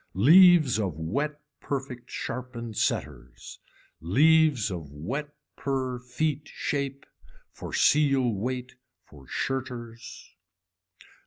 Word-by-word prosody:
Leaves 155 - +6
of 95 -7 -2
wet 140 - -2 0.2
perfect 130 -3 -5
sharpen 120 -2 -6
setters, 65 - -3 0.4
leaves 145 - +3
of 80 -5 -6
wet 135 - -5 0.2
purr 130 -2 -2
feet 145 +4 -2
shape 140 -1 -3 0.5
for - - -9
seal 135 -5 +3
weight 125 +5 -4 0.3
for 70 -3 -17
shirters. 120 -3 -5
130 Hz, 90 wpm, -27 LUFS, 115-145 Hz, 0.5 s, Leaves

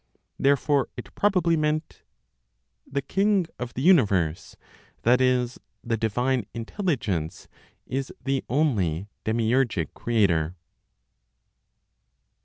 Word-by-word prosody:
Therefore 140 0 +2
it - - -9
probably 185 -5 +2
meant: 155 0 -1 0.9
"The 140 0 -1
King 195 +4 +2
(of 125 -1 -5
the 130 - -2
universe, 100 - +3 0.5
that 125 +2 +4
is, 125 -1 +1 0.2
the 115 -1 0
divine 120 +1 0
Intelligence), 115 - -2 0.4
is 135 +1 -3
the 135 0 0
only 105 - 0 0.2
'demiurgic' 115 - +1
Creator.") 90 -8 +1
125 Hz, 90 wpm, -25 LUFS, 110-145 Hz, 0.9 s, that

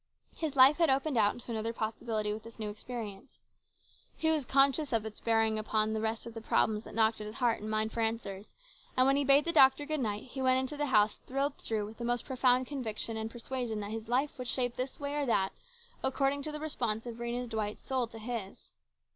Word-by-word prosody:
His 310 -3 -3
life 270 +2 +7
had 335 -3 +3
opened 270 +2 +1
out 210 -3 +3
into 245 0 -9
another 225 0 -2
possibility 220 -1 -2
with 215 - -6
this 230 +1 -12
new 215 -2 -3
experience. 215 0 -8 0.8
He 320 0 +2
was 305 -4 0
conscious 275 +3 +3
of 225 -2 +1
its 220 -1 -7
bearing 225 -1 +2
upon 215 0 +1
all - - -2
the 220 - -1
rest 220 +1 -2
of 235 - -8
the 225 - -7
problems 215 0 +1
that - - -10
knocked 220 -1 +2
at 210 - -5
his 215 - -8
heart 240 -4 +1
and 215 - -5
mind 215 0 0
for 230 - -5
answers, 220 -3 -2 0.4
and 255 - +6
when 270 +1 +4
he 285 - +2
bade 280 +1 +6
the 335 - +1
doctor 280 -2 +6
good 310 0 -1
night 210 -4 -2
he 265 +1 -7
went 255 0 +4
into 260 +3 -3
the 295 0 -1
house 215 -4 +3
thrilled 275 +2 -2
through 215 -2 -2
with 215 +2 -11
the - - -4
most 240 0 0
profound 255 -1 +3
conviction 230 -5 -3
and 220 0 -3
persuasion 240 -1 -4
that 205 +1 -5
his 220 0 -5
life 260 +4 0
would 250 - -4
shape 245 0 0
this 255 +1 -4
way 285 0 -3
or 285 -2 0
that 195 -5 +2 0.5
according 275 +1 0
to 305 - -4
the 300 - -5
response 240 -8 -2
of 235 -1 -6
Rhena 240 +1 -3
Dwight's 215 -2 -3
soul 260 -3 -1
to 225 - -11
his. 220 -3 -6
235 Hz, 235 wpm, -31 LUFS, 220-265 Hz, 0.8 s, life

